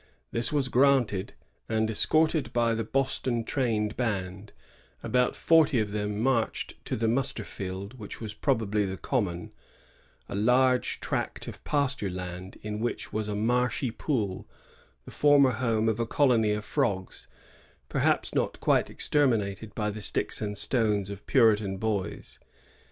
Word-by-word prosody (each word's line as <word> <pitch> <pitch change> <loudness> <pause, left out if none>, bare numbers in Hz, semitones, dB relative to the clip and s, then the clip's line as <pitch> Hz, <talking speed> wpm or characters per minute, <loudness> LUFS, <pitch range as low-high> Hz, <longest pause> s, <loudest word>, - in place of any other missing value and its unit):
This 115 -1 0
was 145 -3 +1
granted; 130 -7 +2 0.4
and, 110 0 +1
escorted 155 +7 +2
by 115 -1 +2
the 115 0 -1
Boston 130 -3 0
trained 110 -5 -1
band, 100 -4 -3 0.5
about 125 0 +1
forty 160 -5 +4
of 105 -2 -1
them 105 0 -2
marched 120 -1 -1
to - - -2
the 115 +1 0
muster 120 -1 0
field, 100 +5 -7
which 105 - -8
was 110 -2 -6
probably 110 -5 0
the 95 -1 -3
Common, 90 -10 -2 0.4
— - - -33
a - - -7
large 125 +5 +2
tract - - -3
of - - -9
pasture 140 -8 0
land 90 0 -7
in 105 0 -4
which 120 +2 -3
was 110 0 -2
a 105 - -3
marshy 120 +3 0
pool, 105 - -3 0.6
the - - -10
former 145 -2 +5
home 115 -2 0
of 110 0 0
a 115 - -1
colony 120 -5 +3
of 105 0 -4
frogs, 105 -10 -2 0.6
perhaps - - +1
not - - -1
quite - - +2
exterminated 110 -7 0
by 105 -1 -1
the 105 +1 -7
sticks 100 - +1
and 105 -1 -3
stones 105 -6 +1
of 100 0 -10
Puritan 105 -6 +3
boys. 105 -2 -3
110 Hz, 150 wpm, -28 LUFS, 105-130 Hz, 0.6 s, former